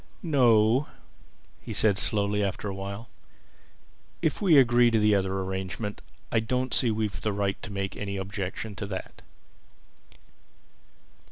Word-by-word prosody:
"No," 125 -4 +4 0.7
he - - -7
said 105 -3 +2
slowly 105 -1 +1
after 100 +1 -3
a 100 - -3
while. 100 +4 -6 1.2
"If 155 - 0
we 175 -7 +5
agree 120 -2 +6
to 115 - +2
the 105 -1 +4
other 95 -1 0
arrangement 95 +2 -4 0.3
I 115 - +3
don't 125 +2 -1
see 125 - +2
that 110 - 0
we've 105 -6 -2
the 105 - 0
right 100 -1 -1
to 105 - -8
make 100 0 -3
any 100 -1 -4
objection 100 +2 -5
to 100 - -4
that." 95 -2 -7
105 Hz, 145 wpm, -27 LUFS, 100-115 Hz, 1.2 s, agree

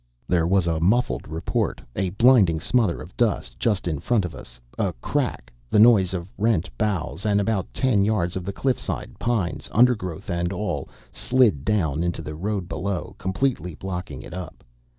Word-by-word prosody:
There 85 -2 +2
was 95 -1 +3
a 80 -2 0
muffled 105 - +1
report, 80 +2 -2 0.2
a 95 0 0
blinding 100 -5 +5
smother 105 -1 +1
of 85 - -14
dust 95 - 0
just 105 -6 0
in 80 -4 -1
front 110 -1 +1
of 90 - -6
us, - - -10 0.2
a - - +1
crack, - - -3 0.2
the - - +2
noise 105 -5 +6
of 85 -1 -4
rent 100 -7 +1
boughs, 90 - -2
and 105 -2 +2
about 100 -2 -1
ten 120 -7 +2
yards 95 -5 0
of 95 - -3
the 100 - -3
cliff 130 +4 0
side - - -5
pines, 115 -8 -1
undergrowth, 105 -8 +2
and 85 -1 -1
all 105 +2 -3 0.2
slid 120 - +2
down 80 -6 +1
into 85 -2 -2
the 75 - -6
road 95 +2 -3
below, 95 +3 -3
completely 95 - -1
blocking 90 -7 -6
it - - -10
up. 90 0 -8
95 Hz, 175 wpm, -24 LUFS, 85-105 Hz, 0.2 s, noise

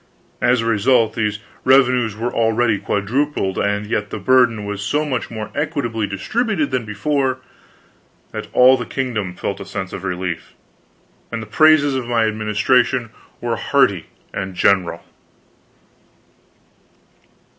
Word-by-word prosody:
As 125 -1 +3
a - - -3
result, 115 +1 +3
these 105 -2 -1 0.3
revenues 125 -4 +3
were 120 +3 -3
already 115 -1 +2
quadrupled, 105 0 -1
and 105 +1 0
yet 105 -1 -2
the - - -5
burden 125 -5 +3
was 100 0 -4
so 145 +9 0
much 130 -5 -3
more 110 -2 -6
equably 140 -8 -2
distributed 165 - -1
than 130 -3 -1
before, 130 +5 -1 0.9
that - - -6
all 130 +1 +6
the - - -5
kingdom 110 -9 -3
felt 100 +2 -4
a - - -6
sense 95 -1 -5
of 95 - -6
relief, 90 -2 -4 0.8
and 115 - -3
the 110 - -6
praises 145 +4 +4
of 130 -2 -3
my 115 -2 +2
administration 110 +3 +1 0.3
were 120 -1 -1
hearty 100 - +1 0.3
and 95 -1 -4
general. 90 -3 +1
115 Hz, 135 wpm, -19 LUFS, 100-130 Hz, 0.9 s, all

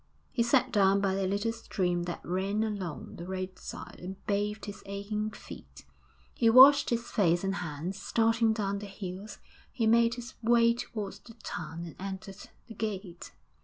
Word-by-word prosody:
He 245 - 0
sat 250 +2 +3
down 195 -2 +4
by 195 -1 +1
a 195 0 0
little 205 +4 0
stream 180 -6 -1
that 175 - -6
ran 195 +4 0
along 200 -7 -4
the 170 - -7
roadside, 185 0 -6
and 185 +2 -7
bathed 210 +1 -1
his 205 - -8
aching 205 +2 -3
feet; 65 - -12 0.5
he 230 - +3
washed 270 +5 +8
his 235 0 -2
face 175 -5 +2
and 195 0 -1
hands; 175 +4 -5
starting 225 0 +2
down 200 -2 -1
the 205 - -7
hill, 195 0 -7 0.4
he 230 - -1
made 230 +1 +4
his 245 +1 -8
way 235 0 +5
towards 215 -4 -5
the 230 - -15
town 165 +1 -5
and 165 - -9
entered 195 0 -7 0.2
the 225 - -9
gate. 195 -5 -5
200 Hz, 165 wpm, -30 LUFS, 185-225 Hz, 0.5 s, washed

